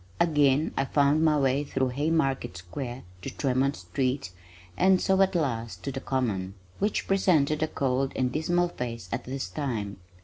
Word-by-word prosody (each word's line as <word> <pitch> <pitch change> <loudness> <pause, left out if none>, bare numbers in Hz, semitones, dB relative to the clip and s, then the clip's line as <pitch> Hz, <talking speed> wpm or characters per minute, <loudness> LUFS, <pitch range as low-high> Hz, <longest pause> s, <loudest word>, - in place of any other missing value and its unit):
Again 150 -3 +3
I 135 - +1
found 145 +3 +3
my 155 -2 +4
way 135 0 +2
through 135 -2 -1
Haymarket 135 - 0
Square 120 +9 -6 0.2
to - - -4
Tremont 135 +1 0
street 135 -4 -2 0.4
and 185 - +4
so 190 +1 +2
at 190 -1 +3
last 115 -8 -2
to 140 - -2
the 135 0 -5
Common, 105 -9 -1 0.2
which 205 +1 0
presented 155 -6 +2
a 155 - +2
cold 135 -2 0
and 125 -1 0
dismal 175 +4 +1
face 115 - -6
at 120 +1 -3
this 135 +1 -4
time. 110 -10 -3
135 Hz, 165 wpm, -27 LUFS, 125-155 Hz, 0.4 s, my